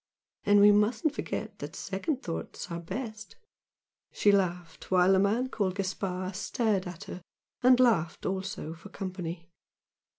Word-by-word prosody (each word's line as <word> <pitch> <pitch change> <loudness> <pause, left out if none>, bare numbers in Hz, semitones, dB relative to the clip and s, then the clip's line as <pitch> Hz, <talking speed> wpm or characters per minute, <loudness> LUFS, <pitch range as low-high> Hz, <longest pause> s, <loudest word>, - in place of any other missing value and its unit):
And 205 0 +6
we 205 +1 +8
mustn't 220 +7 +2
forget - - -4
that - - -7
second 300 -6 -3
thoughts 165 0 -5
are 170 - -3
best!" 215 +5 -6 0.8
She 205 - +4
laughed, 180 -3 -1
while 185 0 +5
the 190 - +5
man 220 +6 +2
called 195 -7 -1
Gaspard 185 -1 -3
stared 205 -3 0
at 180 +2 -7
her 185 -2 -8 0.4
and 255 0 +6
laughed 190 -10 +2
also 190 -4 -3
for 170 +5 -12
company. 180 -4 -5
195 Hz, 140 wpm, -29 LUFS, 180-215 Hz, 0.8 s, we